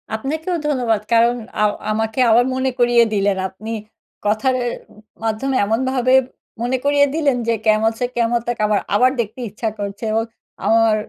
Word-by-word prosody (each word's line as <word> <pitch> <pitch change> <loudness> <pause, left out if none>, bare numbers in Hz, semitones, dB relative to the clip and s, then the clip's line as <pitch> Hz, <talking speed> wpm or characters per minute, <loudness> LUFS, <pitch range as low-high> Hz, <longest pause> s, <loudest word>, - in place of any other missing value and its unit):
আপনাকেও 315 +9 -3
ধন্যবাদ। 245 -7 +1
কারণ 235 +1 +4 0.3
আ - - +4 0.3
আমাকে 220 +2 -2
আবার 235 +2 +5
মনে 260 0 0
করিয়ে 240 -1 +5
দিলেন। 200 -1 +1
আপনি 215 +4 -8 0.5
কথার 215 +5 +1
এ - - 0 0.6
মাধ্যমে 225 +5 -1
এমনভাবে 255 +3 +1 0.5
মনে 245 +2 0
করিয়ে 285 0 +4
দিলেন 285 -6 +1
যে 230 - +3
'কেয়ামত 220 0 +3
ছে 245 - +1
কেয়ামত 235 0 +1
তাক' 240 -3 -2
আবার, 210 -1 +2 0.2
আবার 255 +4 +4
দেখতে 220 +2 -3
ইচ্ছা 220 +2 -3
করছে। 200 +1 -5
এবং 225 +1 +1 0.4
আমার 225 -1 +4
230 Hz, 155 wpm, -19 LUFS, 220-255 Hz, 0.6 s, আবার